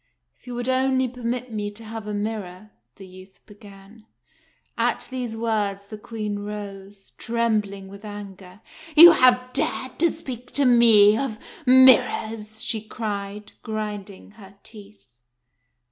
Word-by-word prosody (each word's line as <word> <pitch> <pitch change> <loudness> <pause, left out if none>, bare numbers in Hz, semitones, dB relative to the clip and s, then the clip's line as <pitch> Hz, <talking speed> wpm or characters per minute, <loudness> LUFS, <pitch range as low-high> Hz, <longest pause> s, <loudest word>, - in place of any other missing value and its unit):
"If - - -28
you 245 - -6
would 245 +1 -4
only 260 0 +1
permit 245 0 -5
me 205 -1 -3
to 205 +2 -11
have 220 -1 -8
a 210 - -4
mirror" 205 -2 -5
— - - -54
the 195 - -12
youth 185 +1 -15
began. 205 +1 -16 0.7
At - - -1
these 245 -3 -5
words 210 -3 -2
the 215 +1 -9
Queen 210 -2 -5
rose, 200 -1 -9
trembling 215 -4 -2
with 200 +2 -13
anger. 200 -2 -10 0.4
"You 340 +2 +11
have 250 -4 +3
dared 270 -3 -2
to 340 +1 +5
speak 250 -7 -9
to 280 - +1
me 225 -4 +6
of 235 -3 -3 0.3
mirrors!" 225 -4 +4
she 220 -3 -2
cried, 210 -2 -6
grinding 210 -3 -6
her 200 -2 -16
teeth. 210 -1 -15
215 Hz, 140 wpm, -23 LUFS, 205-240 Hz, 0.7 s, You